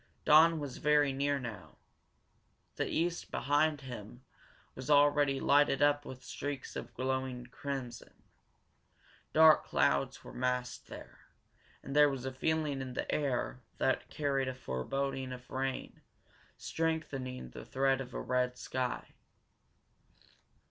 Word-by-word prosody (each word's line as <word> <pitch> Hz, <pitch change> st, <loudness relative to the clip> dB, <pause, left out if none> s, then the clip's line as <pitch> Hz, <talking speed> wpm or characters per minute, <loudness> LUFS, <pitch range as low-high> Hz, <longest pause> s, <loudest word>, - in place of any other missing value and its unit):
Dawn 160 Hz, +2 st, +7 dB
was 140 Hz, -4 st, -5 dB
very 150 Hz, -2 st, +3 dB
near 140 Hz, +1 st, +1 dB
now. 115 Hz, -5 st, -8 dB, 1.0 s
The -, -, -1 dB
east, 170 Hz, +1 st, -1 dB
behind 145 Hz, +3 st, +1 dB
him, 120 Hz, -2 st, -9 dB, 0.5 s
was 130 Hz, +1 st, -8 dB
already 145 Hz, -1 st, +4 dB
lighted 145 Hz, -1 st, +4 dB
up 145 Hz, 0 st, +3 dB
with 130 Hz, -1 st, -9 dB
streaks 145 Hz, -2 st, -5 dB
of 120 Hz, -1 st, -7 dB
glowing 130 Hz, 0 st, -2 dB
crimson. 125 Hz, -2 st, -7 dB, 1.1 s
Dark 160 Hz, 0 st, +7 dB
clouds 70 Hz, 0 st, +1 dB
were -, -, -10 dB
massed 125 Hz, 0 st, -2 dB
there, -, -, -11 dB, 0.6 s
and 135 Hz, -, -6 dB
there 150 Hz, 0 st, +7 dB
was 135 Hz, -2 st, -4 dB
a 130 Hz, -, -3 dB
feeling 150 Hz, 0 st, 0 dB
in 130 Hz, -1 st, -5 dB
the -, -, -2 dB
air 130 Hz, -3 st, -1 dB, 0.2 s
that 130 Hz, -, 0 dB
carried 140 Hz, -3 st, 0 dB
a 130 Hz, -, -3 dB
foreboding 130 Hz, -, -3 dB
of 125 Hz, 0 st, -9 dB
rain, 130 Hz, 0 st, -3 dB, 0.6 s
strengthening 145 Hz, -6 st, -3 dB
the -, -, -9 dB
threat 135 Hz, 0 st, +1 dB
of 130 Hz, -, -7 dB
the -, -, -6 dB
red 125 Hz, 0 st, 0 dB
sky. 125 Hz, -1 st, -3 dB
135 Hz, 130 wpm, -33 LUFS, 125-145 Hz, 1.1 s, Dawn